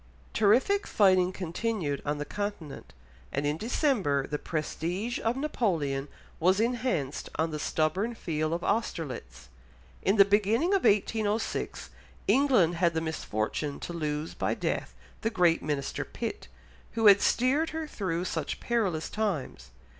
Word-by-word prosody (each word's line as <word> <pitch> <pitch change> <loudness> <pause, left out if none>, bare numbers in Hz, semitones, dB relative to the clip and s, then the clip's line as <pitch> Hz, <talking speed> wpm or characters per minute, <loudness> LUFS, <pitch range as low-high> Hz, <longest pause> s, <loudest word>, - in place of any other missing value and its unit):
Terrific 245 - +3
fighting 185 -3 +4
continued 180 -4 -2
on 145 0 0
the 145 - -4
Continent, 175 - -5 0.4
and 140 +1 -1
in 145 +1 +1
December 205 - +1
the 150 - -3
prestige 175 +8 -3
of 230 +3 0
Napoleon 165 - -1 0.3
was 185 +4 +3
enhanced 230 - -1
on 160 0 0
the 150 - -4
stubborn 185 +11 0
field 155 -5 -2
of 170 +1 -2
Austerlitz. 130 - -3 0.5
In 195 - +2
the 200 -2 +8
beginning 210 - +2
of 390 -7 +2
1806, 215 +1 0 0.4
England 245 - +4
had 170 -1 +2
the - - +2
misfortune 145 -3 -3
to 175 - -5
lose 150 -1 -3
by - - -1
death - - -2 0.3
the 225 - +1
great 175 -6 +3
minister 145 -2 -2
Pitt, 235 - -5 0.5
who 225 -1 0
had 200 -1 +8
steered 275 +6 +2
her 320 0 -4
through 185 - -3
such 160 -5 -3
perilous 200 -10 0
times. 160 - -3
185 Hz, 140 wpm, -29 LUFS, 155-225 Hz, 0.5 s, the